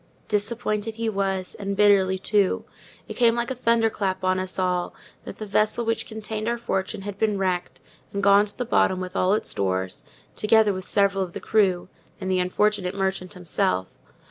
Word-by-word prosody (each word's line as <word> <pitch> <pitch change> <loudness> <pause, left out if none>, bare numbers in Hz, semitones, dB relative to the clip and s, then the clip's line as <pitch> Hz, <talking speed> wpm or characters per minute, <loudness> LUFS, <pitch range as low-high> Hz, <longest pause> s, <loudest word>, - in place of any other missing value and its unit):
Disappointed 215 0 -1
he 230 0 -1
was; 195 -2 -2
and 200 -1 -4
bitterly, 195 -2 +4
too. 200 0 +1 0.4
It - - -6
came 235 -2 +3
like 235 +1 -2
a - - -2
thunder 230 -2 +2
clap 190 -3 -2
on 185 0 +2
us 185 0 -3
all, 180 -1 -1 0.3
that - - -8
the 215 - -6
vessel 215 +3 +1
which 230 0 -1
contained 220 0 -5
our 235 0 0
fortune 195 -3 -3
had 200 -1 -6
been 215 -2 +1
wrecked, 185 -2 -2 0.3
and 200 0 -3
gone 200 +1 +6
to 205 - -7
the 245 - -2
bottom 190 -5 +2
with 185 0 -6
all 190 +2 +3
its - - -1
stores, 95 -1 -2 0.3
together 215 -1 +4
with 185 -1 -6
several 195 -1 +2
of 175 -2 -7
the - - -5
crew, 190 -5 +1 0.3
and 190 - -3
the 185 - +2
unfortunate 190 +1 0
merchant 190 -1 -2
himself. 95 - -1
200 Hz, 190 wpm, -24 LUFS, 185-215 Hz, 0.4 s, gone